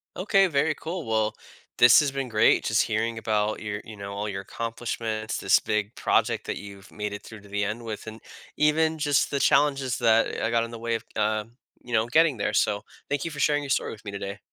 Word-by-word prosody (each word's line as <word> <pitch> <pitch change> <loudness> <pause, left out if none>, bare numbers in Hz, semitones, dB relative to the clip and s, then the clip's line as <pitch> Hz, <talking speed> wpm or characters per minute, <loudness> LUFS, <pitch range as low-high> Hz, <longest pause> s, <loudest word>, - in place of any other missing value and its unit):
Okay, 195 0 +3
very 150 -1 +1
cool. 165 +1 -6
Well, 110 -1 0 0.4
this 120 -1 +8
has 145 -2 +1
been 135 -1 -3
great, 110 0 +4
just 110 0 +2
hearing 115 +1 -1
about 110 -1 0
your, 105 -1 -4
you 110 - -9
know, 100 0 -7
all 100 +1 -3
your 95 -2 -4
accomplishments, 115 0 -4
this - - +4
big 105 0 -2
project - - +1
that - - -3
you've 100 0 -11
made 105 -1 -4
it 105 - -6
through 110 -2 -11
to 100 - -16
the 100 0 -1
end 105 +3 -3
with, 110 -1 -6
and 110 0 -8 0.4
even 160 +1 +2
just 145 -2 +2
the 140 - -1
challenges 135 -3 +2
that, 115 -2 +3
uh, - - 0
got 115 0 +2
in 115 - -6
the 115 - -8
way 115 0 -1
of, - - -4
um, 110 +1 -1 0.3
you 120 - -8
know, 110 0 +2
getting 155 +1 +3
there. 100 - -1
So, 105 -1 +1 0.3
thank 145 +1 -1
you 165 - -3
for 145 - -8
sharing 145 +1 +2
your 140 - -7
story - - 0
with 110 - -11
me 100 - -5
today. 100 +1 -6
115 Hz, 230 wpm, -26 LUFS, 105-140 Hz, 0.4 s, this